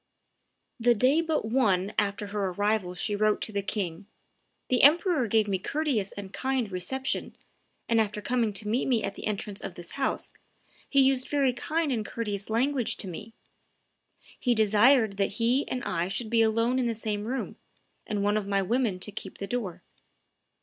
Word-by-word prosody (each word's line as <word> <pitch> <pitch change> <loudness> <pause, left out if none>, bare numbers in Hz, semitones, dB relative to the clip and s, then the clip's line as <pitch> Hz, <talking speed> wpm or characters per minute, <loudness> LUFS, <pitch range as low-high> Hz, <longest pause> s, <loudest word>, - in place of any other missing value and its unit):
The 240 +1 +4
day 260 +9 +4
but 320 -7 -1
one 210 -5 +1
after 205 0 -1
her 200 -1 -2
arrival 205 0 0
she 205 +4 0
wrote 210 0 +2
to - - -2
the 200 -1 -1
king, 195 -2 -4 0.6
"The 250 - +3
emperor 310 -2 +5
gave 220 0 +2
me 195 -2 0
courteous 265 -5 -1
and 200 -1 -8
kind 260 -5 -1
reception, 260 +9 -2 0.5
and, 230 -1 +3
after 210 -1 -2
coming 235 0 0
to 210 +1 -3
meet 230 +5 0
me 245 -4 +2
at 200 - -2
the - - -6
entrance 205 -1 -3
of 175 - -6
this 175 0 -8
house, 275 -1 -1 0.6
he 275 - +5
used 265 -1 +1
very 275 -3 +2
kind 310 +4 -1
and 225 -4 0
courteous 210 -3 -4
language 250 +2 +1
to 195 - -4
me. 210 +6 -8 1.0
He 245 -2 +2
desired 220 0 +4
that 200 0 0
he 245 +4 +2
and 250 - -3
I 170 0 -1
should 215 +4 -3
be 230 -1 +4
alone 230 +3 +2
in 250 - +1
the 230 - -1
same 210 -1 -3
room, 260 +4 -4 0.5
and 205 -2 -1
one 205 +1 +2
of 205 -2 -3
my 200 -1 +1
women 225 -2 0
to 210 - -2
keep 195 -1 -7
the 200 - -4
door. 205 -6 -4
220 Hz, 185 wpm, -28 LUFS, 200-250 Hz, 1.0 s, emperor